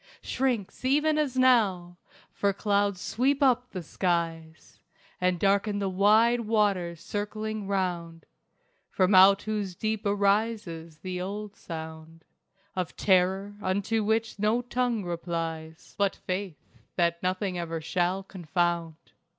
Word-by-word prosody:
Shrinks, 250 -7 -2
even 300 +4 +2
as 270 -4 -1
now! 205 -9 +3 0.4
For 200 -1 0
clouds 200 -1 +1
sweep 270 +8 +1
up 250 -1 +3
the 185 -3 -6
skies 165 -2 -3 0.4
And 180 -1 +1
darken 200 +2 +2
the 200 -1 -1
wide 215 +5 +4
waters 205 -7 0
circling 215 +2 -4
round, 175 -4 -2 0.6
From 185 +1 +2
out 195 +2 +7
whose 210 -4 -3
deep 215 +2 -2
arises 200 -5 0
the 180 -1 -4
old 200 +2 -5
sound 160 -1 -9 0.5
Of 185 -3 -3
Terror 190 +1 +2
unto 200 +4 0
which 220 0 0
no 215 +4 +1
tongue 245 -4 -1
replies 165 -2 -5
But 200 -1 +2
Faith 185 -3 -4 0.4
that 170 -1 +1
nothing 185 0 -1
ever 165 -1 -3
shall 180 +4 -1
confound. 175 -3 -1
195 Hz, 120 wpm, -27 LUFS, 175-215 Hz, 0.6 s, out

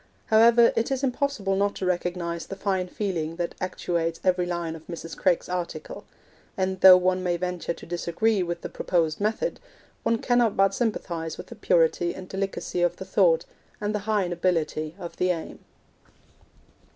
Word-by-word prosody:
However, 230 +2 +6
it 230 - 0
is 270 0 -2
impossible 255 -7 0
not 200 +1 +1
to 190 - -4
recognise 175 -1 -2
the 195 - -6
fine 190 -2 -1
feeling 175 -5 -3
that 175 0 -3
actuates 170 -2 -2
every 180 -1 +2
line 170 -2 -3
of 160 -1 -13
Mrs. 165 -1 -7
Craik's 180 -3 +1
article; 180 -1 -5 0.5
and 190 -1 -1
though 185 -1 +10
one 185 0 +1
may 175 -1 0
venture 180 -1 -3
to - - -12
disagree 175 +5 0
with 170 -1 -3
the - - -4
proposed 165 -1 -1
method, 220 - -1 0.4
one 230 - +1
cannot 240 -2 +2
but 195 0 +4
sympathise 175 -8 -2
with - - -8
the - - -14
purity 170 -3 +2
and 185 -1 -8
delicacy 195 -2 -3
of 175 0 +2
the 190 - -8
thought, 175 -3 +3 0.3
and 210 0 -2
the 210 - 0
high 205 -4 +2
nobility 165 -3 -1
of 175 -3 -8
the 180 - +1
aim. 170 -3 -3
180 Hz, 170 wpm, -26 LUFS, 170-200 Hz, 0.5 s, though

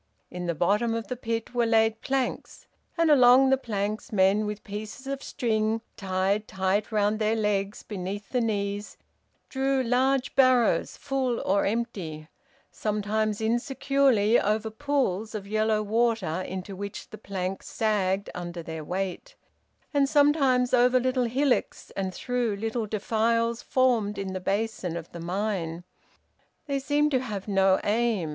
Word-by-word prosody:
In 180 0 -5
the 170 - -1
bottom 210 +8 +1
of 230 -1 -4
the 250 - -2
pit 230 -1 -4
were 240 -1 +2
laid 225 0 +2
planks, 270 -2 -3 0.3
and 330 -2 +4
along 260 -1 +7
the - - +6
planks 215 -1 -3
men 200 +1 +3
with 210 0 -5
pieces 210 +6 -7
of 275 0 -4
string 220 -4 -1
tied 195 +2 -1
tight 190 +3 -1
round 210 0 +1
their 215 +1 +1
legs 205 -2 -1
beneath 200 0 -5
the 250 - 0
knees 205 -2 -2 0.5
drew 270 0 0
large 255 +2 +1
barrows 255 -3 +3
full 260 -3 -1
or 195 +1 +1
empty, 195 -9 -3 0.4
sometimes 215 0 -1
insecurely 240 -1 +2
over 215 +2 0
pools 225 -5 -1
of 205 -2 -5
yellow 215 +1 +1
water 220 -5 0
into 190 +1 -6
which 200 +1 -7
the 215 - -9
plank 190 -2 -4
sagged 200 -3 0
under 175 -1 -6
their 160 -1 -6
weight, 190 - -4 0.6
and 280 -1 +3
sometimes 275 -4 +3
over 250 +1 +5
little 255 0 +1
hillocks 260 +3 0
and 190 -1 -3
through 245 +1 -1
little 225 +2 -2
defiles 230 +2 0
formed 240 -6 +1
in 190 -1 -4
the 185 - -3
basin 195 -3 -2
of 170 -1 -8
the 170 - -8
mine. 175 -2 -3 0.8
They 280 -2 -1
seemed 295 +2 +1
to 260 - +3
have 210 -6 -5
no 195 -1 +3
aim. 215 -5 +1
220 Hz, 145 wpm, -27 LUFS, 195-250 Hz, 0.8 s, along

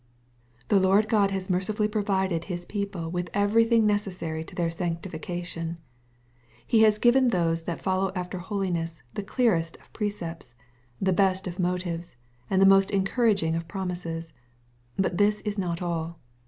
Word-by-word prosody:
The 200 - +5
Lord 195 +3 +4
God 210 -3 +3
has 190 -1 -3
mercifully 205 +3 0
provided 190 -5 0
His 175 -2 -5
people 195 -5 -4
with 175 0 -3
everything 225 +2 +4
necessary 185 -6 -1
to - - -11
their 170 -2 0
sanctification. 170 0 -4 0.9
He 225 - +4
has 215 -1 +5
given 250 +3 +4
those 170 -6 +1
who 170 +1 -3
follow 190 +1 0
after 180 0 -4
holiness 175 -5 -3
the - - -3
clearest 195 -7 +1
of - - -24
pre 210 -2 0
cepts, 165 -10 -8 0.4
the 190 -1 +2
best 190 0 +2
of 180 0 -6
motives, 175 -3 -2 0.3
and 190 - +2
the 195 - +6
most 195 0 +6
encouraging 195 -4 +2
of 165 0 -3
promises. 170 -3 -4 0.6
But 190 -1 0
this 210 +1 +3
is 210 -1 -3
not 175 -2 -2
all. 170 -1 -3
185 Hz, 155 wpm, -27 LUFS, 170-205 Hz, 0.9 s, the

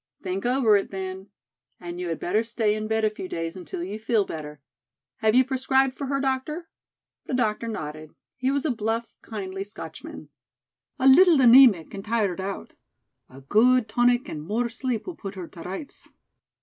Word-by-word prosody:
"Think 190 +3 -3
over 245 -4 +4
it, 195 - -3
then. 190 0 -6 0.5
And 175 0 -7
you 180 -1 -3
had 165 - -3
better 210 +5 0
stay 225 -2 0
in 215 0 -3
bed 220 0 +1
a - - +3
few 200 -3 -7
days 165 +1 -4
until 180 -1 -6
you 200 +4 -5
feel 220 -2 +1
better. 150 -3 -7 0.6
Have 220 +1 +2
you 255 0 +6
prescribed 265 0 +1
for 280 - -5
her, 275 0 0
doctor?" 275 +5 -2 0.6
The 260 - -1
doctor 230 -2 0
nodded. 155 -7 -6 0.2
He 255 0 -1
was 280 +1 0
a 305 - +2
bluff, 225 0 -2
kindly 195 -3 -5
Scotchman. 205 +1 -10 0.7
"A 265 - +2
little 335 +5 +7
anæmic 240 - +6
and 195 -1 -6
tired 210 -5 0
out. 195 +1 -6 0.6
A 130 +1 -13
good 230 - +3
tonic 245 +1 +2
and 150 - -6
more 225 +9 -1
sleep 245 -1 -3
will 360 - -5
put 195 -1 -8
her 180 -3 -7
to 170 - -12
rights." 195 - -8
220 Hz, 180 wpm, -25 LUFS, 190-255 Hz, 0.7 s, little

